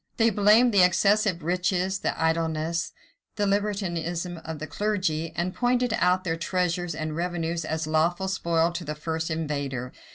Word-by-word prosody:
They 230 0 +4
blamed 215 +4 +5
the 200 - +6
excessive 195 0 +3
riches, 180 +2 0
the - - -2
idleness, 160 0 0 0.4
the 205 - 0
libertinism 180 -4 -1
of 160 -1 -6
the 155 - -5
clergy; 185 -6 -1
and 180 +2 -1
pointed 245 -1 +1
out 180 -1 +2
their 165 -3 -1
treasures 175 -1 -1
and 155 -1 -4
revenues 170 -1 -2
as 160 0 -2
lawful 165 +4 +1
spoil 170 -3 +1
to 170 +1 -5
the 150 -1 -4
first 160 +2 -3
invader. 140 -5 -3
170 Hz, 155 wpm, -26 LUFS, 160-190 Hz, 0.4 s, the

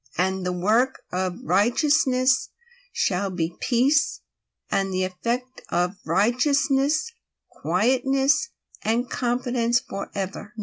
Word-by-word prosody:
032:017 190 +2 0
The 180 - 0
work 220 +9 +1
of 180 0 -2
righteousness 255 - +2 0.6
will 195 +2 -1
be 170 -2 -3
peace; 270 +3 +2 0.5
and 195 0 0
the 185 0 0
effect 235 +8 -3
of 180 +2 0
righteousness, 275 - +2 0.4
quietness 270 - +1 0.3
and 235 +3 0
confidence 240 -1 0
forever. 200 +2 -6
240 Hz, 95 wpm, -24 LUFS, 190-265 Hz, 0.6 s, righteousness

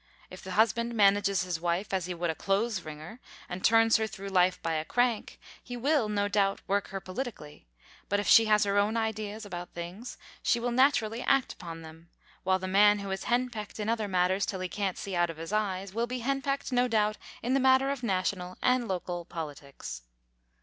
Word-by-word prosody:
If 185 - -10
the 185 - -6
husband 235 +3 +2
manages 200 -2 +3
his 175 -3 -3
wife 175 +4 -1
as 185 -2 0
he 180 - -4
would 170 -1 -1
a - - -4
clothes 195 +3 0
wringer, 155 +8 -9 0.3
and 180 +1 -6
turns 225 0 +5
her 220 0 -1
through 200 -1 -7
life 185 -1 +3
by 165 - -1
a 155 -1 -1
crank, 245 +4 0 0.2
he 245 0 -6
will, 270 -2 +1
no 205 -1 0
doubt, 200 -1 +1
work 200 0 0
her 195 - -5
politically; 185 - -7 0.4
but 205 - +2
if 205 - -3
she 225 - +8
has 210 -1 +4
her 200 0 +2
own 210 +3 +1
ideas 215 -1 -3
about 175 -3 -7
things, 180 +8 -7 0.2
she 240 - +2
will 240 +1 -1
naturally 240 -3 +2
act 270 -1 +2
upon 165 -2 -9
them, 160 +1 -13 0.3
while 185 0 +2
the 185 0 -5
man 205 +2 +5
who 200 -1 -5
is 190 - -4
henpecked 240 -4 -2
in 210 +1 -2
other 225 -2 0
matters 185 +1 +1
till 190 -3 -3
he 185 - -2
can't 195 -2 -2
see 195 -2 -5
out 175 0 +2
of 165 - -7
his 165 +5 -6
eyes, 195 -2 -1
will 230 +2 -1
be 250 0 -4
henpecked, 275 +2 -1
no 250 0 +3
doubt, 215 -2 +1 0.3
in 245 +2 0
the 275 - +3
matter 265 +1 +4
of 280 -3 -4
national 185 -4 -2
and 250 -2 +2
local 180 -2 -3
politics. 145 - -7
205 Hz, 210 wpm, -29 LUFS, 180-230 Hz, 0.4 s, she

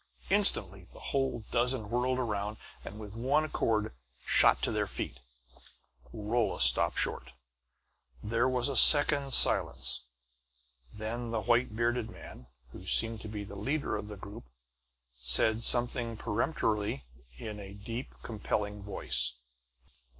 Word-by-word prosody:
Instantly - - +1
the - - -15
whole 135 -5 -1
dozen 120 -3 0
whirled 125 +1 0
around 105 -3 -3 0.3
and 105 - -10
with 105 -2 -9
one 135 +6 +1
accord 110 - -1 0.3
shot - - +4
to - - 0
their - - -1
feet. 65 - -6 0.9
Rolla 110 +1 -2
stopped 60 0 +5
short. - - -1 0.9
There 115 +4 0
was 125 0 0
a 140 - -3
second's 145 +1 +6
silence; 65 -2 +3 0.9
then 115 +3 -5
the 115 -1 -2
white 120 -1 +1
bearded 120 0 -1
man, 65 - -13 0.2
who - - -12
seemed 115 -2 +1
to - - -8
be 105 -1 -6
the 100 0 -10
leader 135 +6 -3
of 105 - -5
the 105 -1 -8
group, 100 - -11 0.7
said 85 - +2
something 120 -1 +2
peremptory 105 - -2 0.3
in 105 +7 -8
a 100 0 -10
deep, 115 +5 -7
compelling 105 -2 -4
voice. 100 -10 +2
110 Hz, 130 wpm, -30 LUFS, 105-120 Hz, 0.9 s, second's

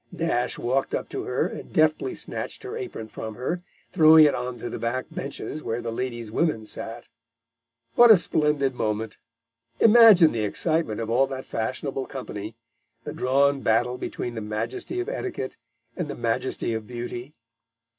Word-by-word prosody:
Nash 125 -7 -1
walked 130 +3 0
up - - -4
to - - -4
her - - 0
and - - -7
deftly 155 - +2
snatched - - -5
her 405 +2 -6
apron 375 - -6
from 110 0 -7
her, 130 +9 -2 0.3
throwing 160 -2 +8
it 145 - +3
on 125 0 -4
to - - -6
the - - -5
back 120 +2 -2
benches 140 +2 -5
where 115 -3 -3
the 115 -1 -4
ladies' 120 -2 -4
women 115 -5 0
sat. 115 +2 -7 0.9
What 240 0 +7
a 220 - +10
splendid 150 -5 +1
moment! 110 -2 -3 0.6
Imagine 215 -7 +8
the 110 -2 -2
excitement 155 - -1
of 115 0 -3
all 135 +3 +3
that 130 -1 -6
fashionable 130 +4 -3
company 110 -5 -7 0.5
the - - -6
drawn 140 +2 +2
battle 120 +2 +1
between 120 - -4
the 110 - -5
Majesty 115 - -4
of 365 - -3
Etiquette 385 - -4 0.4
and 175 - -3
the 145 - -5
Majesty 115 0 -1
of 110 -1 -4
Beauty! 120 +3 -6
130 Hz, 165 wpm, -25 LUFS, 115-155 Hz, 0.9 s, a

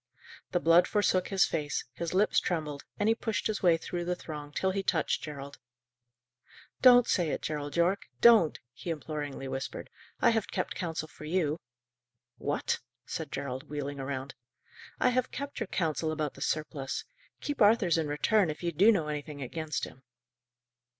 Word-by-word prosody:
The 175 - +2
blood 165 +2 +5
forsook 185 -3 +2
his 195 -2 +4
face, 150 -3 -2
his 170 +4 -4
lips 205 +3 +4
trembled, 150 -5 -3
and 205 - +2
he 225 - +5
pushed 225 -1 -2
his 215 -2 -1
way 175 -3 +5
through 175 +1 -4
the 180 +1 -1
throng 150 -4 -7
till 190 +5 0
he 195 +1 -1
touched 170 -4 +1
Gerald. 140 -2 -7 1.2
"Don't 245 -2 +8
say 175 -4 +1
it, - - -3
Gerald 145 0 -3
Yorke! 180 +4 +2
Don't!" 225 -9 +6 0.2
he 170 - -7
imploringly 150 -3 -4
whispered. 135 0 -5 0.3
"I - - +5
have 225 -2 0
kept - - -2
counsel 160 -4 -3
for 155 - -12
you." 160 -1 0 0.8
"What?" 145 - -1 0.3
said 160 -3 -5
Gerald, 140 +1 -4
wheeling 145 -1 -4
round. 135 0 -4 0.7
"I 250 - +4
have 255 0 +1
kept 280 0 -5
your 225 - -2
counsel 160 -3 -1
about 155 -2 -2
the - - -13
surplice. 150 -3 -2 0.3
Keep 290 -3 -4
Arthur's 205 -6 +5
in 160 - -1
return, 180 +6 +2
if 155 +3 -5
you 170 - 0
do 195 +8 +6
know 170 -8 +1
anything 150 -1 -4
against 155 +3 -3
him." 130 - -7
160 Hz, 170 wpm, -30 LUFS, 145-190 Hz, 1.2 s, Don't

